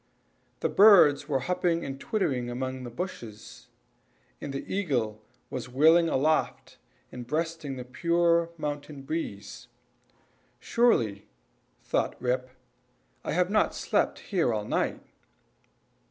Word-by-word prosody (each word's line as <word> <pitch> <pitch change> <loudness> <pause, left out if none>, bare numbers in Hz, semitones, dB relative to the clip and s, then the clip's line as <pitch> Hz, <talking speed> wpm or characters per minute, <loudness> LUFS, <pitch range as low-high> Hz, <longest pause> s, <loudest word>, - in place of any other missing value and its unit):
The - - +2
birds 195 -10 +6
were 135 -3 +1
hopping 175 +1 0
and 135 0 -6
twittering 135 - -1
among 130 +1 -4
the - - -6
bushes, 110 - -8 0.7
and 145 - -5
the 140 - -5
eagle 125 - -1 0.3
was 125 -1 -5
wheeling 160 +6 +5
aloft, 155 +3 0 0.3
and 125 -1 -8
breasting 160 -1 -2
the 125 -1 -7
pure 170 +4 +2
mountain 145 -2 -5
breeze. 135 -9 -5 0.9
"Surely," 115 - +1 0.6
thought - - -1
Rip, 125 +1 -1 0.7
"I - - -3
have 180 +3 +1
not 215 - +2
slept - - 0
here 175 -10 +2
all 105 -2 -2
night." - - -1
145 Hz, 115 wpm, -28 LUFS, 125-170 Hz, 0.9 s, birds